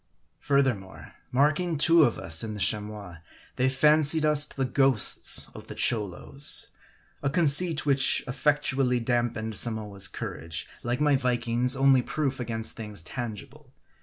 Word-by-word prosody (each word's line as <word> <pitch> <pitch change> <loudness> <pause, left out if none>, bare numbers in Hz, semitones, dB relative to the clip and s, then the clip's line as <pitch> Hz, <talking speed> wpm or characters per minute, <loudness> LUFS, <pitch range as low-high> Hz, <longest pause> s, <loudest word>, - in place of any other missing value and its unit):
Furthermore, 130 -9 -2 0.2
marking 150 +5 0
two 165 +2 +5
of 120 - -2
us 80 +3 -1
in 110 -1 -6
the - - -8
Chamois, 105 -4 -2 0.4
they 130 +1 +1
fancied 150 +3 +3
us 150 -1 +3
the 135 -3 -4
ghosts 135 -3 +1
of - - -12
the - - -9
Cholos. 110 +6 0 0.5
A 140 - -1
conceit 160 +1 +3
which 135 -2 +3
effectually 135 -1 0
damped 115 -2 -2
Samoa's 105 -4 0
courage, 80 0 -7
like 120 +3 -3
my 145 -1 +3
Viking's, 125 0 +1
only 135 -1 +3
proof 135 0 -3
against 115 -2 -4
things 105 -6 -7
tangible. 110 +2 -8
125 Hz, 135 wpm, -26 LUFS, 110-140 Hz, 0.5 s, two